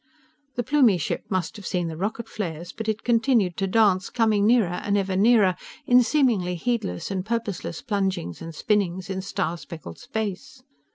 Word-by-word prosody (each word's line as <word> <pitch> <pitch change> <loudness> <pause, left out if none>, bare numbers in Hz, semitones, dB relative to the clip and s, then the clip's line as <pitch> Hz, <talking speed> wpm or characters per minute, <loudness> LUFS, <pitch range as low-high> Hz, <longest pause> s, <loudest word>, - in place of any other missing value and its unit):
The 245 - -1
Plumie 250 -7 +4
ship 155 - -3
must 185 +2 -2
have 205 - -8
seen 175 -2 -1
the 160 - -5
rocket 215 +6 -3
flares, 175 -5 -5
but 220 0 -4
it 215 0 -2
continued 230 -6 +2
to 195 - 0
dance, 195 -2 +3
coming 215 -3 +2
nearer 215 -7 +3
and 205 0 +1
ever 195 -1 -1
nearer 205 -2 +4 0.3
in 250 0 +6
seemingly 230 -10 +2
heedless 190 - -2
and 190 -2 -2
purposeless 215 -6 -3
plungings 190 - -2
and 165 -1 -7
spinnings 190 -1 0
in 190 0 -2
star 180 -3 -2
speckled 160 - -9
space. 220 +4 -5
200 Hz, 170 wpm, -25 LUFS, 180-225 Hz, 0.3 s, in